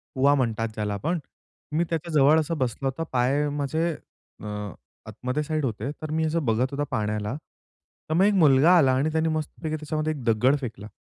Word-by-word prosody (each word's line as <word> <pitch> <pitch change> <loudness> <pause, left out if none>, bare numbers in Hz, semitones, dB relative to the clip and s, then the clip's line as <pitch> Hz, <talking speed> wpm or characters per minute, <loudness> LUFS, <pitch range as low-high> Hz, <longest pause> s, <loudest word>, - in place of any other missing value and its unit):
कुवा 140 +2 +4
म्हणतात 115 -4 0
ज्याला 105 -1 -2
आपण. 165 - -1 0.5
मी 155 +3 +1
त्याच्या 165 +1 -3
जवळ 150 +2 +5
असं 160 +1 -2
बसला 130 0 -2
होता. 135 +5 -2
पाय 135 +4 +2
माझे 160 +4 0 0.5
अ, - - -8 0.6
आतमध्ये 125 +7 -3
साईड 155 -1 -1
होते. 115 +2 -3
तर 155 -1 -5
मी 160 +1 +1
असं 160 -1 -1
बघत 115 +2 +2
होता 140 +1 -2
पाण्याला. 105 +1 -2 0.7
तर - - 0
मग 175 +4 +4
एक 210 - +4
मुलगा 160 -1 +6
आला 135 -6 +4
आणि 145 +4 +1
त्याने 160 +1 +1
मस्तपैकी 155 0 -3
त्याच्यामध्ये 155 0 -2
एक 140 -4 -8
दगड 120 +4 +3
फेकला. 110 -5 -6
145 Hz, 185 wpm, -25 LUFS, 125-155 Hz, 0.7 s, मुलगा